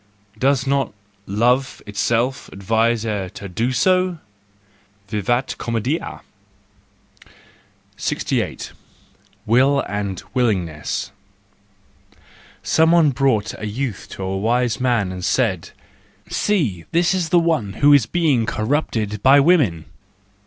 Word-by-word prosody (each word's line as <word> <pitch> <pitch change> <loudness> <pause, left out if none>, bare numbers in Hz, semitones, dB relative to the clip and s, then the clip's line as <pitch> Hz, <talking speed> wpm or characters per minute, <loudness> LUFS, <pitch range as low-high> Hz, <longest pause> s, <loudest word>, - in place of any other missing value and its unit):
Does 135 +1 +2
not—love 115 0 -1
itself 115 +5 -1
advise 110 +3 0
her 105 -4 -3
to 100 - -7
do 115 +8 -1
so? 185 +5 +2 0.9
Vivat 115 +5 -1
comcedia! 120 +7 -3 1.8
68. - - -2 0.7
Will 130 +5 +3
and 100 -3 -4
Willingness 95 - -1 1.5
.—Some 160 +1 +3
one 165 -4 +5
brought 130 -5 +1
a 105 - -4
youth 115 0 -4
to 95 - -6
a 95 +1 -2
wise 120 +2 0
man 120 -7 +1
and 90 -1 -7
said, 100 -6 0 0.6
"See, 130 - 0
this 170 +2 +2
is 175 -4 -2
one 165 - +2
who 145 +7 +4
is 135 -6 +4
being 145 -8 +1
corrupted 110 -4 -1
by 135 +4 +6
women! 135 - +3
120 Hz, 105 wpm, -20 LUFS, 105-140 Hz, 1.8 s, by